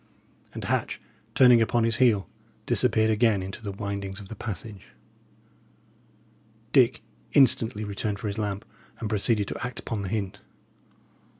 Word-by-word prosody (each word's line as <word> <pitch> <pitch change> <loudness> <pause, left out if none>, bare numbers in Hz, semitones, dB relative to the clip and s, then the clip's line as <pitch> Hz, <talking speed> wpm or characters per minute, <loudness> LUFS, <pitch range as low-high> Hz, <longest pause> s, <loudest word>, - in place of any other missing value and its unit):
And - - -5
Hatch, - - -1 0.4
turning 125 -3 +7
upon 115 +1 +2
his 115 -1 +1
heel, 115 -7 +3 0.4
disappeared 110 0 +2
again 110 -3 +2
into 95 +3 -7
the 105 -3 -4
windings 100 0 -5
of 100 -2 -11
the 110 - -7
passage. 100 - -8 1.8
Dick 125 -5 +4 0.3
instantly 115 -6 +4
returned 100 0 -3
for 105 - -8
his 105 +1 -3
lamp, 105 -2 -3 0.3
and 110 - -3
proceeded 105 0 +1
to - - -5
act 120 -1 -5
upon 110 -3 -4
the 95 - -4
hint. 100 -2 -3
105 Hz, 140 wpm, -26 LUFS, 100-115 Hz, 1.8 s, turning